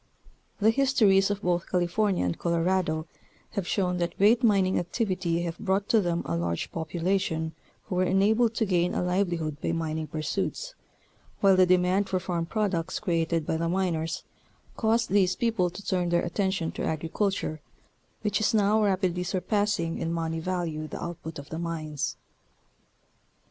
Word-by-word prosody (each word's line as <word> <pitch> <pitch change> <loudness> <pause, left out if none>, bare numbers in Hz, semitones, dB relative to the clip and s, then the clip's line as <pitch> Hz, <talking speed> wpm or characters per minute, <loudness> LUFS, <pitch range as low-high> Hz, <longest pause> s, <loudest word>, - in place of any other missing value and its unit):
The 220 +1 +5
histories 220 -7 +4
of 205 0 -3
both 175 0 0
California 180 - +1
and 90 - -1
Colorado 170 -2 0 0.5
have 200 -4 -3
shown 180 -3 0
that 170 -1 -2
great 220 +5 +5
mining 195 -4 +3
activity 175 -3 -1
have 170 -1 -4
brought 195 +1 0
to 225 - +5
them 175 -2 -1
a 85 - -1
large 85 0 -2
population 165 -1 -1 0.3
who - - -6
were 180 0 +2
enabled 215 +5 +3
to 225 - +1
gain 180 -2 +1
a - - 0
livelihood 175 -5 -1
by - - -1
mining 160 -1 -2
pursuits, 160 - -3 0.7
while 195 -1 +5
the 185 0 +5
demand 185 +2 +3
for 185 - +1
farm 170 -2 -2
products 190 -5 -1
created 165 -4 0
by 160 - 0
the 165 +1 -1
miners, 170 -3 -1 0.5
caused 230 +1 +1
these 190 -2 +3
people 220 -6 +1
to 195 +4 -10
turn 180 -2 0
their 170 0 +2
attention 190 -1 -1
to - - -5
agriculture, 160 0 -1 0.6
which 210 0 +1
is 215 +1 +2
now 210 +1 +3
rapidly 185 -3 +1
surpassing 185 -1 0
in 165 - -2
money 165 -1 -2
value 165 -3 -3
the - - -6
output 165 -2 -6
of 140 0 -9
the 160 - -4
mines. 155 -3 -3
180 Hz, 160 wpm, -27 LUFS, 165-200 Hz, 0.7 s, The